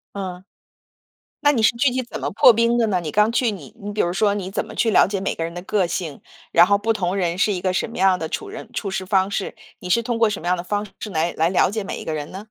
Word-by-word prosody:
嗯。 185 -2 -5 1.0
那 290 0 +4
你 230 -5 0
是 215 - +7
具 265 +4 +3
体 255 +1 -1
怎 240 - -8
么 - - -2
破 230 - +7
冰 230 +1 +2
的 230 -2 +2
呢？ 190 -3 +1
你 155 -3 -5
刚 210 +2 +3
去， 235 -2 +1
你 160 -9 -10
你 205 +1 -5
比 210 - -3
如 175 - +1
说， 200 +1 +2
你 190 -2 -4
怎 - - -3
么 - - -10
去 225 - +1
了 - - +5
解 195 0 -3
每 195 - -2
个 165 - -2
人 165 +1 -5
的 175 - -6
个 190 -2 +1
性， 165 -5 -4 0.3
然 175 - +6
后 200 +1 +4
不 220 +3 0
同 185 -3 -1
人 180 -2 -1
是 205 +1 +2
一 180 - -3
个 185 0 0
什 180 - -1
么 230 - -10
样 190 -1 +3
的 160 - -4
处 420 - -4
人 405 - -9
处 200 - -3
事 190 -1 -3
方 190 0 +2
式？ 200 - -3 0.2
你 180 - -8
是 235 +6 +3
通 235 -1 -2
过 225 -1 +4
什 205 - -4
么 175 - -8
样 180 - +2
的 175 - -6
方 205 +2 -2
式 215 - -6
来 165 -1 0
来 160 +1 +2
了 185 0 +2
解 215 -1 -3
每 - - -5
一 - - -8
个 160 - -3
人 150 -1 -5
呢？ 200 +4 -8
195 Hz, 330 characters per minute, -22 LUFS, 180-220 Hz, 1.0 s, 是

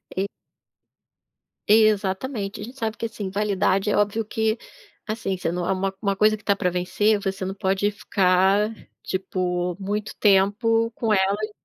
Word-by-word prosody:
E 195 +1 0 1.4
Exatamente, 210 0 +2
a - - -5
gente 250 +5 -10
sabe 225 -2 -3
que, 230 - -3
assim, 215 -4 -5
validade 200 0 +1
é - - +2
óbvio 205 +2 +1
que, 220 +1 0 0.5
assim, 215 -3 -2
você 170 -2 -2
não 175 0 -2
é - - +1
uma 195 0 -1
uma 200 -2 0
coisa 215 +2 +4
que 215 - -15
tá 200 - +2
pra 180 -3 0
vencer, 205 +4 +1
você 195 -1 -3
não 190 - -3
pode 195 +1 0
ficar, 200 +1 +2 0.3
tipo, 180 -1 -2
muito 205 +2 -3
tempo 225 +3 +3
com 225 -1 0
ela 205 +2 +1
200 Hz, 160 wpm, -24 LUFS, 190-215 Hz, 1.4 s, coisa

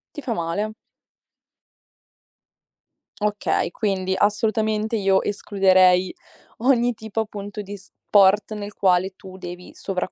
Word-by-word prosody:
Ti 295 - -6
fa 240 - -2
male. 200 +4 -2 2.5
Okay, 210 -1 0
quindi 190 -3 -1
assolutamente 215 +1 +1
io 195 -2 +2
escluderei 185 -3 +3 0.5
ogni 245 -1 +2
tipo, 220 0 -5
appunto, 205 -1 -5
di 205 0 -8
sport 200 +2 +2
nel 205 -1 -6
quale 185 0 +2
tu 190 -1 -12
devi 180 0 -9
sovracc 185 -1 -3
205 Hz, 105 wpm, -22 LUFS, 190-215 Hz, 2.5 s, escluderei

